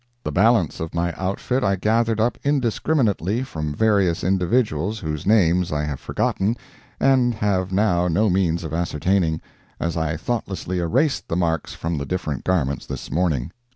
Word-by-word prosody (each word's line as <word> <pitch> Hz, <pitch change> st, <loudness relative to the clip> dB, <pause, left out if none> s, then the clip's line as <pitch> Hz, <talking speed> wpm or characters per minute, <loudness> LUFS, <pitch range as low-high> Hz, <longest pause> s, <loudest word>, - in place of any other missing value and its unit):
The -, -, -3 dB
balance 110 Hz, -4 st, +3 dB
of 80 Hz, 0 st, -5 dB
my 85 Hz, 0 st, 0 dB
outfit 100 Hz, +7 st, -1 dB
I 100 Hz, -1 st, +2 dB
gathered 110 Hz, +3 st, +1 dB
up 115 Hz, +3 st, +1 dB
indiscriminately 120 Hz, -, +1 dB
from 75 Hz, -, -4 dB
various 100 Hz, -6 st, +2 dB
individuals 95 Hz, 0 st, +1 dB
whose 75 Hz, -5 st, -4 dB
names 90 Hz, -4 st, +3 dB
I 75 Hz, 0 st, 0 dB
have 75 Hz, -3 st, -3 dB
forgotten 105 Hz, +5 st, -1 dB, 0.4 s
and 130 Hz, -3 st, +3 dB
have 95 Hz, -3 st, 0 dB
now 95 Hz, -3 st, +2 dB
no 95 Hz, +6 st, +2 dB
means 90 Hz, -3 st, +1 dB
of 80 Hz, -, -5 dB
ascertaining, 85 Hz, 0 st, 0 dB, 0.4 s
as 85 Hz, 0 st, -2 dB
I 80 Hz, -1 st, -1 dB
thoughtlessly 95 Hz, -3 st, -3 dB
erased 130 Hz, -, +1 dB
the -, -, -2 dB
marks 80 Hz, -3 st, -1 dB
from 85 Hz, -2 st, -3 dB
the 70 Hz, -, -4 dB
different 80 Hz, -7 st, -3 dB
garments 70 Hz, -7 st, 0 dB
this 65 Hz, -, -6 dB
morning. 80 Hz, -5 st, 0 dB
90 Hz, 155 wpm, -22 LUFS, 80-110 Hz, 0.4 s, balance